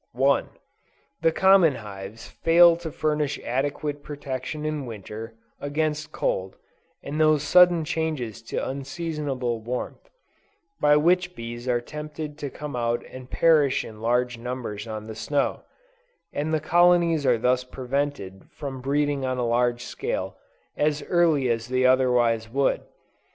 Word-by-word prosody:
1. - - +2 0.7
The 165 - +4
common 190 -4 +5
hives 105 0 -9
fail 170 +1 +5
to 170 -1 -6
furnish 150 -1 -1
adequate 145 +3 -2
protection 145 +1 -5
in 150 -3 -3
Winter, 110 +1 -8 0.2
against 150 +1 -2
cold, 95 0 -2 0.5
and 150 +3 -2
those 155 -2 +4
sudden 175 +1 +5
changes 150 -9 -3
to 115 - -3
unseasonable 135 -3 -3
warmth, 125 +3 -5 0.7
by 150 0 +5
which 175 +3 +2
bees 120 +1 -7
are 120 -1 +2
tempted 150 +3 -7
to 145 - -4
come 150 0 -7
out 120 0 -1
and 130 -1 -10
perish 150 -5 +3
in 110 -1 -11
large 120 +1 0
numbers 115 -4 -5
on 110 -1 -6
the 110 - -7
snow; 140 +6 -1 0.7
and 150 +2 -2
the 155 - +2
colonies 170 0 +4
are 125 -3 +3
thus 125 +2 +1
prevented 125 -6 -3
from 135 -3 -7
breeding 145 +1 0
on 130 -1 -1
a 125 - 0
large 120 +1 +1
scale, - - -4 0.4
as 150 0 0
early 165 -7 +3
as 115 -1 -1
they 130 0 +1
otherwise 125 -3 +3
would. 135 +3 +1
135 Hz, 140 wpm, -25 LUFS, 120-155 Hz, 0.7 s, common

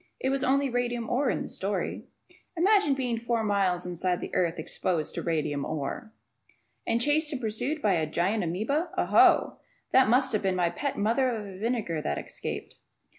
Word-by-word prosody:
It 265 - 0
was 275 0 0
only 275 +2 +2
radium 240 -2 -1
ore 260 +2 +2
in - - -1
the - - -6
story. 195 0 -3 0.5
Ed.] - - -1
Imagine 390 -7 +4
being 245 -4 -1
four 235 -1 -1
miles 195 -4 +1
inside 180 +1 -1
of 175 - -4
the - - -6
earth 170 -2 +1
exposed 160 0 -2
to - - -3
radium 150 -4 -1
"ore"! 155 - -4 0.8
And 230 0 +2
chased 295 +4 +2
and 275 - -3
pursued 245 +7 -3
by 205 -3 +3
a 160 -3 0
gigantic 180 +5 0
amoeba! 280 - -1
Oh, - - 0
oh! - - +5 0.3
That 260 -4 +5
must 260 +1 +3
have 215 - +1
been 190 -1 0
my 175 -2 +1
pet 280 -2 -3
mother 230 +6 +2
of 205 -5 -5
vinegar 215 -8 -1
that 75 - -2
escaped. - - -6
225 Hz, 190 wpm, -28 LUFS, 180-260 Hz, 0.8 s, oh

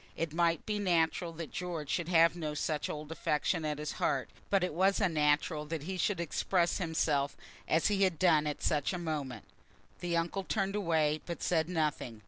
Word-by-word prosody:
It 165 -2 -2
might 170 -1 +1
be 210 -1 -1
natural 170 -2 +1
that 165 -1 -7
George 170 -5 -4
should 170 - -1
have 170 -1 +5
no 155 -3 -4
such 150 0 -1
old 150 +1 -6
affection 160 +1 0
at 150 -1 -1
his 150 0 -3
heart, 135 -2 -1 0.2
but 195 -2 +3
it 180 - -1
was 190 +4 +3
unnatural 150 -4 +2
that 160 -2 -4
he 190 +4 -4
should 185 +1 0
express 170 +1 +1
himself 155 -5 0 0.3
as 160 - +2
he 205 -2 +2
had 185 -4 +3
done 160 -4 +4
at 150 - -4
such 150 +3 +1
a - - -2
moment. 155 -7 -4 0.5
The 175 -1 -1
uncle 175 +4 -1
turned 195 -1 -1
away, 160 -6 +1
but 170 - -5
said 160 -1 +1
nothing. 150 -9 -1
165 Hz, 190 wpm, -32 LUFS, 150-180 Hz, 0.5 s, have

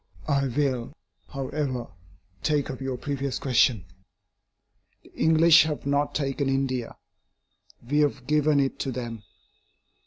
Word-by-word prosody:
I 140 -2 +1
will, 130 -1 -1 0.3
however, 135 -2 -3 0.6
take 150 -3 0
up 130 - -8
your 130 -1 -3
previous 140 0 -3
question. 120 -6 +2 1.2
The - - -20
English 160 +1 +6
have 150 -3 -4
not 140 +1 0
taken 140 -1 -1
India; 135 -3 -2 0.9
we 145 +3 +1
have 140 -4 +1
given 150 +1 +3
it 135 -1 -1
to 135 - -2
them. 115 -3 -5
135 Hz, 120 wpm, -26 LUFS, 130-145 Hz, 1.2 s, English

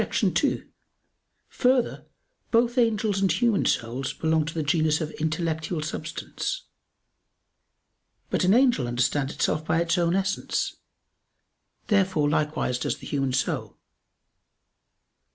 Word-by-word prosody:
2: - - 0 0.8
Further, 250 -1 +1 0.4
both 240 +2 +2
angels 215 -4 +1
and 195 - +3
human 235 -4 +2
souls 125 +3 -1
belong 160 -1 +1
to 165 - -5
the 160 - -1
genus 155 0 +2
of 155 -2 -3
intellectual 160 0 -2
substance. - - -4 1.7
But - - +1
an 185 +4 +5
angel 245 - +3
understands 135 +3 0
itself 155 - 0
by 160 +1 +1
its 170 +1 +1
own 170 +1 +2
essence. 195 0 -1 1.1
Therefore 190 -7 +2
likewise 150 -4 0
does - - -1
the 135 - -12
human 135 -1 -1
soul. 130 0 -2
160 Hz, 115 wpm, -26 LUFS, 150-200 Hz, 1.7 s, an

